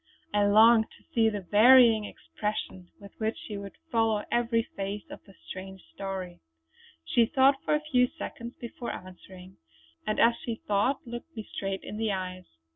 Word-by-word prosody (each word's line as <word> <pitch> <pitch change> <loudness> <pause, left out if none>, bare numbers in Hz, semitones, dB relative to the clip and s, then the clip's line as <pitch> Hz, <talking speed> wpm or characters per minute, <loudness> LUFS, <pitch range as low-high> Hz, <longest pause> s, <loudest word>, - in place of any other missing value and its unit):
I 205 0 +3
longed 220 +2 +6
to - - -25
see 225 -2 +4
the 205 -2 -4
varying 225 +2 +6
expression 205 -4 -5
with 200 -1 -12
which 220 0 -1
she 210 - -8
would 200 -1 -8
follow 225 -2 +2
every 230 -1 +1
phase 200 +1 -4
of - - -10
the 195 - -17
strange 190 0 -8
story. 190 -2 -6 0.7
She 235 -2 +3
thought 270 0 +3
for - - +2
a 300 - -1
few 255 -5 +2
seconds 235 0 -8
before 235 0 -6
answering, 185 0 -11 0.5
and 215 - 0
as 235 0 +5
she 235 - -3
thought 210 +7 +1
looked 240 +7 -8
me 220 - -4
straight 195 -1 -3
in 210 - -7
the 220 -1 0
eyes. 185 -1 -4
215 Hz, 170 wpm, -28 LUFS, 195-235 Hz, 0.7 s, longed